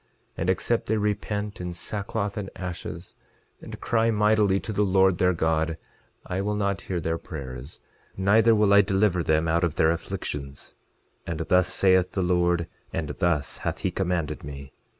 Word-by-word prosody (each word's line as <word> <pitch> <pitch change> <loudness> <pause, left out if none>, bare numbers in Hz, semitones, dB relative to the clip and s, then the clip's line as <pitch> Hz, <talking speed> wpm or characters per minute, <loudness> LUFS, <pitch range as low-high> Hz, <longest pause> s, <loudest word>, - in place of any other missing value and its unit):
11:25 - - -41 0.3
And 85 - 0
except 115 +5 +1
they 110 - +1
repent 105 -1 -2
in 90 -1 -5
sackcloth 100 +3 -3
and 100 -2 -4
ashes, 90 -1 -6 0.5
and - - -9
cry 115 -1 +1
mightily 105 -2 +3
to 110 - -5
the 105 - +1
Lord 95 -2 +3
their 90 0 +4
God, 80 0 0 0.5
I 90 +1 -2
will 105 +1 -1
not 100 -3 -1
hear 90 0 -3
their 80 0 -2
prayers, 65 -2 -8 0.4
neither 110 +4 +4
will 105 -1 +4
I 100 - +8
deliver 95 -2 +2
them 80 0 +1
out 85 +2 +2
of 85 -3 0
their 80 - +4
afflictions; 75 -5 -5 0.5
and 85 -1 -3
thus 90 +2 +2
saith 95 -1 +3
the 95 - 0
Lord, 90 -1 +2 0.2
and 80 -3 -3
thus 75 -3 0
hath - - -3
he 95 - 0
commanded 90 -4 -2
me. 70 -1 -9
90 Hz, 170 wpm, -26 LUFS, 80-100 Hz, 0.5 s, I